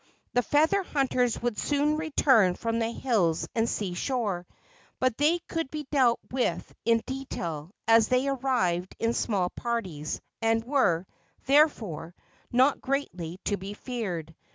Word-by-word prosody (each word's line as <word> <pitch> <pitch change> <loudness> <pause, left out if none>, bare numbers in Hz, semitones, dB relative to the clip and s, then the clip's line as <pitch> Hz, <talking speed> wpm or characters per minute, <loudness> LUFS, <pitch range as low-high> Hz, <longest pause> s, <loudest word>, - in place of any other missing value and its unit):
The 245 - +4
feather 315 - +3
hunters 255 -8 0
would 240 -3 -1
soon 295 +1 +1
return 265 - +3
from 230 0 -1
the 225 0 0
hills 210 -10 0
and 230 0 +1
sea 195 -4 -2
shore; 200 -5 -2 0.5
but 255 -3 +2
they 305 +4 +3
could 330 -4 -2
be 300 0 -5
dealt 255 -5 +4
with 255 -1 -1
in 230 0 +3
detail 170 - -5 0.2
as 225 -1 +6
they 255 +2 +2
arrived 240 -10 0
in 230 +1 0
small 195 -7 0
parties, 190 -11 -3 0.2
and 225 0 +2
were, 230 - +2 0.4
therefore, 225 - +2 0.4
not 260 +3 +3
greatly 180 - -3
to 205 - 0
be 200 +2 -7
feared. 185 - -4
235 Hz, 140 wpm, -28 LUFS, 185-270 Hz, 0.5 s, as